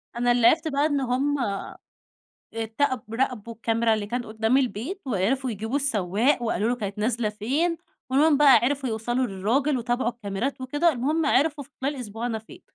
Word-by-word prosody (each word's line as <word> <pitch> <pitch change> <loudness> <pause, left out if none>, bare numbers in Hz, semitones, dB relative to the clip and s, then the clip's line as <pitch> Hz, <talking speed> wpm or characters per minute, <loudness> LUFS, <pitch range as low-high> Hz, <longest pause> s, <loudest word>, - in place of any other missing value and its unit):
أنا 245 0 +2
اللي 240 -1 +5
عرفته 315 +3 +3
بقى 285 0 +1
إن 290 -2 +1
هُم 265 +3 0 1.2
اتقب 225 0 -2
راقبوا 235 -3 -2
الكاميرا 225 0 +1
اللي 210 -1 -3
كانت 240 +2 -3
قدام 220 +3 +1
البيت، 265 - -1
وعرفوا 250 +4 0
يجيبوا 220 +4 -3
السواق 235 -1 +1
وقالوا 220 -2 0
له: 245 - 0
"كانت 205 -3 -5
نازلة 225 +1 0
فين؟" 270 +12 -1 0.3
ومنه 290 +3 +4
بقى 290 -2 +7
عرفوا 270 0 0
يوصلوا 240 +3 -1
للراجل 245 +8 0
وتابعوا 240 0 0
الكاميرات 235 +3 -4
وكده، 290 +6 +1
المهم 295 +5 0
عرفوا 290 0 +2
في 275 - -24
خلال 280 +2 -1
أسبوع 230 -2 -5
أنا 225 -2 -2
فين. 290 +12 -14
245 Hz, 170 wpm, -25 LUFS, 220-280 Hz, 1.2 s, بقى